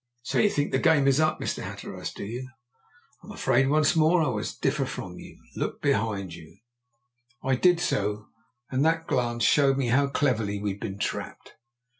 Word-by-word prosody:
"So -, -, -1 dB
you 210 Hz, -, +4 dB
think 145 Hz, -6 st, -1 dB
my -, -, +3 dB
game 155 Hz, -5 st, +4 dB
is 135 Hz, +1 st, +4 dB
up, 155 Hz, 0 st, +2 dB
Mr. -, -, -3 dB
Hatteras, -, -, -6 dB
do -, -, -7 dB
you? 125 Hz, +5 st, -6 dB, 0.7 s
I'm -, -, -14 dB
afraid 135 Hz, +1 st, +2 dB
once 155 Hz, +2 st, +3 dB
more 160 Hz, +2 st, +4 dB
I 145 Hz, -, 0 dB
must 105 Hz, -2 st, -4 dB
differ 140 Hz, +1 st, +1 dB
from 90 Hz, -8 st, -7 dB
you. -, -, -12 dB, 0.2 s
Look -, -, -3 dB
behind 100 Hz, -4 st, -1 dB
you." 85 Hz, +2 st, -13 dB, 0.9 s
I 135 Hz, -, +1 dB
did 175 Hz, +5 st, +4 dB
so, 105 Hz, -8 st, -1 dB, 0.5 s
and 130 Hz, +1 st, +1 dB
that 165 Hz, +1 st, +1 dB
glance 120 Hz, -4 st, -1 dB
showed 135 Hz, 0 st, +4 dB
me 130 Hz, -3 st, 0 dB
how 140 Hz, +4 st, +3 dB
cleverly 115 Hz, -8 st, 0 dB
we'd 100 Hz, -1 st, -3 dB
been 95 Hz, 0 st, -5 dB
trapped. -, -, -5 dB
130 Hz, 180 wpm, -26 LUFS, 105-150 Hz, 0.9 s, you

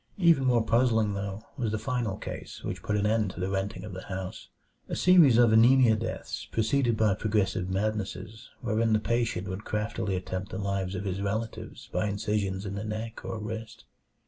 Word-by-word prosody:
Even 170 Hz, -8 st, +4 dB
more 120 Hz, -3 st, +3 dB
puzzling, 115 Hz, -3 st, +3 dB
though, 100 Hz, +2 st, -4 dB
was 115 Hz, -5 st, -1 dB
the 110 Hz, -, 0 dB
final 120 Hz, -4 st, -2 dB
case -, -, -7 dB
which -, -, -4 dB
put 105 Hz, -, -1 dB
an 105 Hz, -, +1 dB
end 110 Hz, -1 st, +2 dB
to 95 Hz, -, -9 dB
the 95 Hz, +1 st, -1 dB
renting 100 Hz, +2 st, -2 dB
of 105 Hz, -2 st, -7 dB
the 95 Hz, -, -7 dB
house 95 Hz, -1 st, -6 dB, 0.4 s
a -, -, -2 dB
series 170 Hz, -10 st, +6 dB
of 120 Hz, -2 st, +6 dB
anemia 120 Hz, +1 st, +6 dB
deaths 110 Hz, -, -5 dB
preceded 120 Hz, +1 st, +1 dB
by 105 Hz, -2 st, +3 dB
progressive 100 Hz, -3 st, 0 dB
madnesses 105 Hz, +2 st, -3 dB
wherein 115 Hz, -2 st, +1 dB
the 110 Hz, -, +4 dB
patient 115 Hz, -3 st, -1 dB
would 95 Hz, +2 st, -5 dB
craftily 105 Hz, -1 st, -2 dB
attempt 95 Hz, +1 st, -4 dB
the 95 Hz, -, -5 dB
lives 100 Hz, -1 st, -2 dB
of 100 Hz, +2 st, -4 dB
his 95 Hz, 0 st, -2 dB
relatives 110 Hz, +3 st, -4 dB
by 105 Hz, -, +1 dB
incisions 100 Hz, -1 st, -1 dB
in 100 Hz, -, -4 dB
the 100 Hz, +1 st, -4 dB
neck 110 Hz, +1 st, -5 dB
or -, -, -4 dB
wrist. 110 Hz, +1 st, -6 dB
105 Hz, 190 wpm, -28 LUFS, 100-115 Hz, 0.4 s, series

